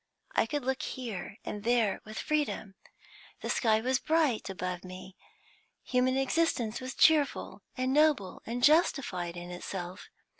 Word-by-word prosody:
I - - +2
could 285 +1 -3
look 265 0 0
here 215 -7 -5
and 205 -1 -5
there 230 -3 +2
with 215 0 -8
freedom; 295 -9 -1 0.7
the - - -2
sky 220 -2 +3
was 260 +2 +1
bright 310 -10 +1
above 180 -1 -4
me; 185 +1 -10 0.7
human 255 +1 +2
existence 270 -5 +1
was 255 +1 -5
cheerful 305 -3 +3 0.2
and 255 +1 0
noble 295 -10 +3
and 240 +2 -3
justified 245 - +3
in 175 0 -7
itself. 180 0 -6
240 Hz, 140 wpm, -30 LUFS, 190-270 Hz, 0.7 s, sky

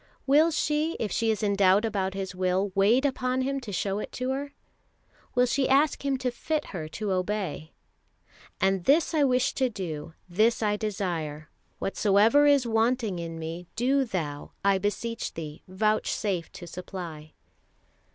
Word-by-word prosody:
Will 300 +4 +5
she, 305 0 0
if 210 - -2
she 230 -1 +1
is 220 0 0
in 200 -1 +2
doubt 195 +2 +4
about 195 -3 -1
His 190 -1 -4
will, 185 +2 0
wait 220 +8 +4
upon 255 -1 0
Him 275 +1 -1
to 240 -6 -8
show 195 +2 -1
it - - -6
to 255 +1 -2
her? 280 +2 -3 0.8
Will 250 0 +5
she 265 +2 +1
ask 280 +2 +3
Him 275 -1 +1
to 255 -1 -1
fit 305 +5 -2
her 160 -4 -4
to 205 +5 -4
obey? 185 -4 -2 0.9
"And 190 -1 +1
this 310 +5 +4
I 305 -2 +3
wish 255 -1 +2
to 260 -2 +1
do, 165 -7 -6
this 220 +6 +2
I 210 -1 +2
desire; 170 -8 -3 0.3
whatsoever 210 +9 +4
is 285 -3 +4
wanting 225 -3 +1
in 165 -1 -5
me, 165 +2 -6
do 265 +4 +2
Thou, 160 - -4
I 195 -1 +4
beseech 225 +3 -3
Thee, 155 -1 -7
vouchsafe 200 -2 0
to 175 - -9
supply." 170 -3 -8
210 Hz, 160 wpm, -27 LUFS, 185-255 Hz, 0.9 s, Will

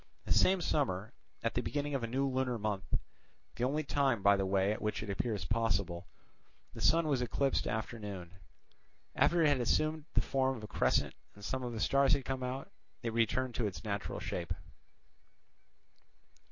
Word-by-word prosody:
The - - +3
same 190 -1 +4
summer, 110 - 0 0.3
at 115 - 0
the 125 - +1
beginning 145 +2 -2
of 135 - 0
a - - 0
new 135 +4 0
lunar 130 -2 0
month, 105 -3 -2 0.6
the - - -4
only 145 +5 +1
time 135 -7 +1
by 100 0 +7
the 95 -1 0
way 95 +1 +2
at 105 - -3
which 105 0 -1
it 105 - -4
appears 100 -2 -2
possible, 95 -5 0 0.7
the - - -8
sun 165 +1 +4
was 135 -4 +1
eclipsed 135 +2 0
after 110 +1 -3
noon. 95 -4 -7 0.8
After 170 -1 +4
it - - +6
had 145 -3 +3
assumed 155 +5 +1
the - - +5
form 135 -1 +1
of 110 - -10
a - - -5
crescent - - +1 0.2
and 100 0 -10
some 130 +3 -2
of 120 -1 -4
the 115 - -4
stars 140 +6 +4
had 140 -2 0
come 130 -1 -2
out, 130 +2 -4 0.3
it 115 -1 -2
returned 115 +2 +1
to 115 -1 0
its 90 -4 -6
natural 100 -1 -3
shape. - - -3
120 Hz, 185 wpm, -33 LUFS, 105-135 Hz, 0.8 s, by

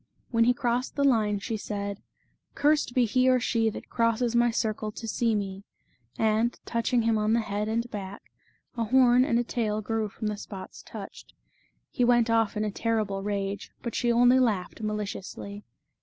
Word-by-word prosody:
When 230 -1 +4
he 245 - +4
crossed 245 +1 -1
the 280 - +1
line, 220 -6 +3
she 220 +3 -3
said: 200 -1 -4 0.3
" - - -44
Cursed 295 -4 +2
be 250 -2 +4
he 255 +3 +3
or 255 0 +4
she 230 -2 +1
That - - -8
crosses 230 0 +1
my 240 0 +4
circle 215 -1 -2
to 225 +2 -8
see 230 0 +1
me" 195 -1 -4 0.5
and, 220 +2 +1
touching 235 +1 0
him 225 -1 +2
on 215 +1 +1
the 235 - +3
head 210 0 -3
and 230 +2 -1
back, 200 -1 -6 0.5
a 230 -1 -1
horn 250 +1 +5
and 235 -3 +1
a 240 - +2
tail 220 -3 -1
grew 220 0 -1
from 215 - -7
the 210 -1 -1
spots 195 -2 -9
touched. - - -10 0.6
He 250 - 0
went 240 -1 +4
off 225 -2 +2
in 215 - 0
a 210 - -2
terrible 215 -3 -1
rage, 200 0 -3
but 235 - -4
she 240 -1 +1
only 245 +2 +5
laughed 215 -5 0
maliciously. 205 -1 -5
225 Hz, 185 wpm, -27 LUFS, 210-240 Hz, 0.6 s, horn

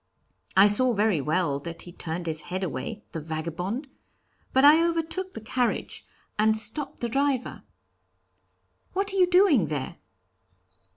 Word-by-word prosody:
I 195 - +8
saw 240 +5 +5
very 205 -6 +1
well 150 -1 0
that 165 +3 -8
he 175 - -11
turned 170 0 -5
his 155 -1 -2
head 185 +2 -3
away, 180 - -5
the 165 - -5
vagabond! 170 - -4 0.6
But 265 +2 +4
I 310 +3 +7
overtook 335 +3 -2
the - - -7
carriage 245 +2 -2 0.3
and 220 +1 +3
stopped 225 +7 0
the 240 - 0
driver. 270 +1 -1 1.3
'What 390 +1 -1
are - - -2
you 365 -1 +5
doing 355 - +4
there?' 145 -3 -4
220 Hz, 140 wpm, -26 LUFS, -, 1.3 s, I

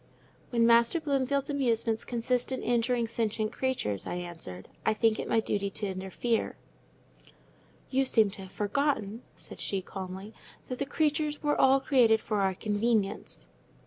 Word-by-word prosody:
"When 235 -2 +3
Master 235 +7 +5
Bloomfield's 280 -1 0
amusements 230 -5 +1
consist 245 +1 -1
in 260 - -3
injuring 240 0 +1
sentient 220 -1 -1
creatures," 250 - -2
I - - -3
answered, 165 - -6 0.2
"I 220 - +2
think 220 0 +2
it - - -4
my 225 - +3
duty 200 -2 -1
to 205 +2 -3
interfere." 190 +4 -2 1.3
"You 270 0 +2
seemed 220 -6 +3
to - - -7
have 190 -1 -10
forgotten," 220 -1 -1
said - - -11
she, 195 -2 -1
calmly, 190 +3 -7 0.4
"that 255 - -4
the 280 - -1
creatures 300 0 0
were 295 0 +2
all 265 +1 +6
created 245 -5 +4
for 210 -1 -1
our 190 -1 +1
convenience." 210 0 -1
230 Hz, 150 wpm, -29 LUFS, 200-260 Hz, 1.3 s, all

